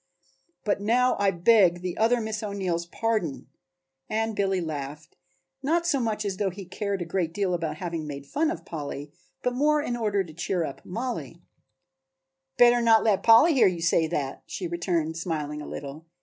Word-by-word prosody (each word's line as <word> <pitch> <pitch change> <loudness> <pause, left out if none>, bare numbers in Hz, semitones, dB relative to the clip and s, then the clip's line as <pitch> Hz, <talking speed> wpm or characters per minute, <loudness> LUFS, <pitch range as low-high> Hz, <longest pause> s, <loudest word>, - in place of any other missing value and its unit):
But 205 -1 0
now 245 +4 +3
I 200 -1 +3
beg 175 -1 +4
the 180 -1 -3
other 235 +2 +3
Miss 220 -2 -3
O'Neill's 190 -5 -2
pardon," 215 -8 -2 0.6
and 220 0 -1
Billy 195 -2 +1
laughed, 150 -1 -6 0.5
not 330 +5 +1
so 295 -5 +2
much 215 -3 -1
as 195 -2 -2
though 200 -1 0
he 190 +1 -9
cared 200 0 -3
a - - -9
great 170 -1 -2
deal 195 -3 0
about 165 -3 -2
having 165 -3 -4
made 140 -1 -7
fun 305 - 0
of 330 - -5
Polly, 145 -2 -6 0.3
but 250 - 0
more 300 +4 +3
in 245 -5 -2
order 210 -4 0
to 160 -4 -12
cheer 170 +1 -1
up 140 - -8
Mollie. 235 +6 -5 1.1
"Better 240 0 +6
not 225 -2 +5
let 210 -4 +2
Polly 235 +9 +7
hear 260 - +5
you 175 -3 -2
say 165 -2 +3
that," 145 -5 -3
she 185 - -5
returned, 170 -2 -1
smiling 150 -3 -3
a - - -8
little. 145 +3 -8
190 Hz, 180 wpm, -26 LUFS, 165-225 Hz, 1.1 s, Polly